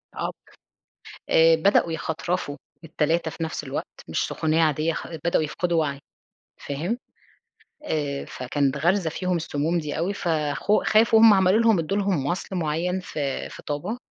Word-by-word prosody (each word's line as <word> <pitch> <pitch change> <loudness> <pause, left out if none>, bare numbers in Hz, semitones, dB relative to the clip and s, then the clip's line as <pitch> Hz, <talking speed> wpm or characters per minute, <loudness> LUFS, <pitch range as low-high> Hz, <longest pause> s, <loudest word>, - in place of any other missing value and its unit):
آه - - -2
ب - - -8 1.0
آآ 165 0 +6
بدأوا 170 -1 +3
يخترفوا 160 -1 -3 0.3
ال3 160 +1 0
في 165 - -8
نفس 160 - -4
الوقت، - - -6
مش - - 0
سخونية 160 +1 +1
عادية 155 +1 +1
خ - - -5 0.2
بدأوا 170 -2 +2
يفقدوا 170 +2 0
وعي، 140 -2 -2 0.6
فاهم؟ 165 - -3 0.9
آآ 145 - -2
فكانت 135 +2 -1
غارزة 175 +2 +1
فيهم 180 +2 -2
السموم 165 +1 -1
دي 150 -1 -4
أوي 180 +5 -1
فخو 160 +3 0
خافوا 220 +1 +5
هُم 225 -2 +8
عملوا 190 +2 +4
لهم 225 -6 +4
ادوا 180 +6 -1
لهم 195 -8 0
مَصل 185 +3 -3
معيّن 175 +3 -1
في 145 -6 -4
في - - -11
طابا، 175 +11 -3
165 Hz, 155 wpm, -24 LUFS, 150-185 Hz, 1.0 s, هُم